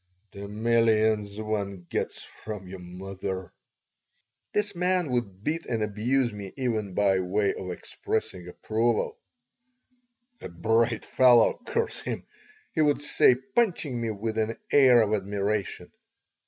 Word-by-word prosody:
"The 100 0 -8
millions 110 -1 +2
one 100 -4 -3
gets - - -3
from 105 -4 -8
your 95 +1 -8
mother!" 95 +1 -6 1.0
This 210 0 0
man 180 -3 +1
would 105 -6 -2
beat 160 +4 -2
and 115 -2 -1
abuse 115 +4 0
me 100 -2 -7
even 110 -7 -2
by 100 -2 +3
way 100 +2 +1
of 90 - -6
expressing 90 0 -4
approval 110 +5 -1 1.2
"A - - -6
bright 115 +6 +1
fellow, 125 - +5
curse 460 -1 -1
him!" - - -4 0.5
he 160 - +1
would 145 -1 +2
say, 130 - +5
punching 165 - -1
me 115 - -1
with 110 +1 -3
an 110 +1 -1
air 130 -5 +7
of 105 0 -1
admiration. 100 0 -2
110 Hz, 130 wpm, -27 LUFS, 100-125 Hz, 1.2 s, air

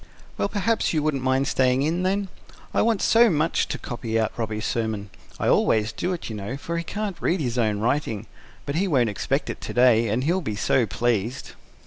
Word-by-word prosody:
"Well, 200 - -1
perhaps 215 +1 0
you 155 -2 +1
wouldn't 150 -3 0
mind 130 +1 +1
staying 130 0 +2
in 165 +4 0
then? 195 +1 0 0.4
I - - +3
want 225 -3 +1
so 230 +1 +6
much 160 -1 +1
to - - -3
copy 115 -2 -3
out 110 - 0
Robby's 110 -1 -3
sermon. 110 -3 -2 0.3
I - - 0
always 110 -1 +3
do 175 +11 -2
it, 180 - -4
you 110 - -5
know, 105 +6 -5
for 170 +2 -5
he - - -3
can't 205 +1 -4
read 180 - +1
his 125 -4 -1
own 110 -3 +1
writing. 115 -3 -1 0.4
But 140 - -3
he 195 +3 +1
won't 125 - +2
expect 105 - -1
it - - -10
to - - -5
day 120 -2 +5
and 110 +5 0
he'll 175 +6 +1
be 110 -10 -3
so 115 +3 +2
pleased." 115 +2 -1
130 Hz, 210 wpm, -24 LUFS, 110-170 Hz, 0.4 s, so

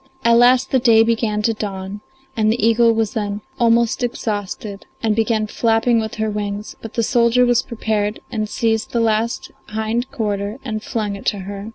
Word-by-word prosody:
At 235 0 +6
last 250 +2 +4
the 260 - +4
day 230 -2 +5
began 225 -2 0
to 225 - +2
dawn, 200 -1 -5 0.3
and 215 -1 +2
the 235 - -1
eagle 230 0 +4
was 225 -2 0
then 205 -1 -3 0.2
almost 235 0 +3
exhausted 205 -3 -4 0.2
and 220 -2 +2
began 220 -1 +1
flapping 225 +2 +2
with 220 -1 -4
her 220 0 -1
wings, 205 0 -4
but 225 - -9
the 230 - +1
soldier 240 0 +3
was 245 -1 +3
prepared 215 -3 -2
and 215 -3 -2
seized 225 -1 -1
the 235 - +1
last 225 0 0 0.2
hind 220 +3 -2
quarter 210 -4 -3
and 215 -3 -3
flung 210 -2 -3
it 200 - -8
to 205 - +1
her. 200 +2 -7
220 Hz, 185 wpm, -20 LUFS, 210-235 Hz, 0.3 s, At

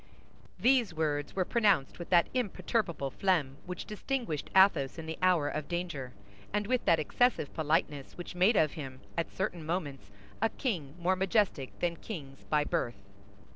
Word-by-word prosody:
These 245 -8 +3
words 145 -2 -1
were 185 -1 +1
pronounced 200 - +2
with 175 - -7
that 175 -2 +6
imperturbable 205 - -1
phlegm 160 -9 +1
which 180 -1 -5
distinguished 215 - -3
Athos 190 -9 +5
in 165 - -6
the 160 0 -5
hour 180 -5 +4
of 150 0 -3
danger, 170 -8 -3 0.4
and 210 0 0
with 250 +3 +1
that 165 - +5
excessive 160 - +1
politeness 150 -3 -1
which 175 - -7
made 185 +6 +4
of 155 -5 +4
him 135 -4 -8
at 170 - -2
certain 180 -4 -3
moments 145 - -3 0.3
a 225 - +3
king 170 - -3
more 180 +2 +2
majestic 190 - 0
than 170 -1 0
kings 140 -10 -8
by 150 -1 +2
birth. 145 -7 -1
170 Hz, 160 wpm, -31 LUFS, 145-195 Hz, 0.4 s, that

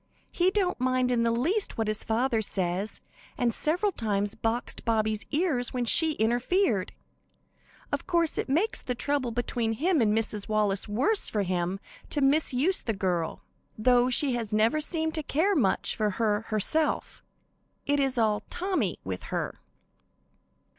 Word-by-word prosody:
He 360 +1 +2
don't 375 -4 0
mind 255 0 +1
in 240 -1 +2
the 230 - +2
least 315 - 0
what 225 -1 -1
his 215 0 -2
father 230 +1 0
says, 190 0 -2 0.4
and 240 -2 +1
several 355 - 0
times 205 - -1
boxed 225 +2 -2
Bobby's 220 -2 0
ears 290 -7 0
when 245 -1 0
she 320 +6 +5
interfered. 240 - +1 1.0
Of - - -3
course, 335 -2 +1
it - - -3
makes 345 +11 +1
the 250 - -3
trouble 280 0 -1
between 235 -1 -1
him 320 - +1
and 215 -2 +3
Mrs. 215 -1 -1
Wallace 210 -2 +1
worse 270 - +2
for 210 -2 0
him 180 +1 -2 0.3
to 295 - -1
misuse 285 +4 +2
the 225 - -2
girl, 180 -4 -2 0.3
though 245 +2 +3
she 260 +1 +1
has 230 -3 -3
never 220 +8 +2
seemed 320 0 -1
to 315 - -2
care 320 +8 +1
much 240 - +1
for 215 -1 0
her 215 -1 0
herself. 260 +9 0 0.6
It 285 0 +1
is 270 -2 0
all 215 -2 +2
'Tommy' 355 - -1
with 95 -1 -5
her. - - -4
240 Hz, 155 wpm, -27 LUFS, 215-305 Hz, 1.0 s, she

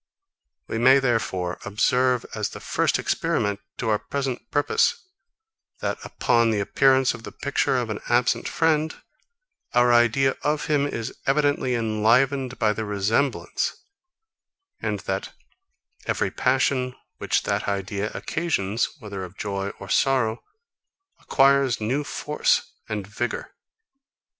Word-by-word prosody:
We 110 - -3
may, 130 +3 +7
therefore, 115 -9 -1
observe, 125 +4 +1
as - - -2
the - - -9
first - - +1
experiment 100 -1 0 0.2
to 115 - -2
our 105 -1 +2
present 135 -4 -4
purpose, 450 - +2 0.8
that, - - -2
upon 115 -1 +2
the 110 -2 +1
appearance 130 +5 +3
of - - -9
the - - -8
picture 140 -2 0
of 120 -3 -2
an 105 - -4
absent 120 0 +2
friend, 160 -1 +1 0.8
our 120 0 +5
idea 120 +3 +3
of 150 0 0
him 145 -2 +2
is 115 -5 -4
evidently 145 -2 +2
enlivened 120 +4 +2
by 110 -2 +2
the 110 - -4
resemblance, 105 +6 0 1.1
and - - -2
that - - -4 0.7
every - - 0
passion, 130 -1 +1 0.2
which - - 0
that - - -1
idea 100 +1 -2
occasions, 115 - -1
whether 100 -7 -7
of 90 +1 -10
joy 100 -1 -3
or 95 - -8
sorrow, 125 -2 +1 0.8
acquires 135 -2 +3
new 125 +7 -1
force 150 +1 0 0.2
and 105 -2 -3
vigour. 105 +5 -4
120 Hz, 125 wpm, -24 LUFS, 105-135 Hz, 1.1 s, may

